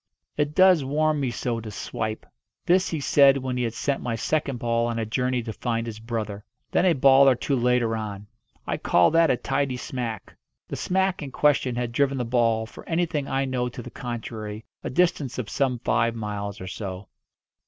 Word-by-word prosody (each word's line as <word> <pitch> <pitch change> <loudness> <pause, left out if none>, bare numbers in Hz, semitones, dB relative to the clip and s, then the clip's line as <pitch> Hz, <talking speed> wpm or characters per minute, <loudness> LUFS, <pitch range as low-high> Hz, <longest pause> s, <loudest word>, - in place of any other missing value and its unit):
"It 150 0 -1
does 185 -5 +6
warm 150 +2 +1
me 135 -3 0
so 120 0 -2
to 110 -1 -7
swipe." 110 +1 -4 0.4
This 185 +2 +3
he 160 - -2
said 140 -1 +5
when 130 -1 -3
he 125 - -1
had 115 -2 -2
sent 140 +3 -1
my 120 -2 -2
second 140 +2 -1
ball 115 0 0
on 115 -1 -2
a 115 - -1
journey 125 +2 -1
to 110 -1 -5
find 115 0 -2
its 110 -1 -6
brother. 110 -3 -4 0.3
Then 185 - +3
a 175 - +5
ball 135 -1 +6
or 130 - +4
two 140 +3 -1
later 120 -2 +2
on, 105 -2 -5 0.4
"I - - -2
call 90 - +3
that 165 0 +4
a 125 - +3
tidy 135 -1 -1
smack." 125 - -5 0.3
The - - -5
"smack" 190 0 0
in 145 - -5
question 135 -4 +2
had 120 -1 -2
driven 140 +2 +1
the 125 - -1
ball, 115 -2 +2
for - - -12
anything 165 -4 0
I 135 0 0
know 125 -2 -1
to 120 0 -8
the 125 - -9
contrary, 110 -3 -6 0.2
a - - -3
distance 145 -4 +1
of 125 -5 -4
some 130 -3 +1
five 115 0 +1
miles 105 -2 -4
or 95 - -7
so. 95 0 -6
125 Hz, 205 wpm, -25 LUFS, 115-140 Hz, 0.4 s, does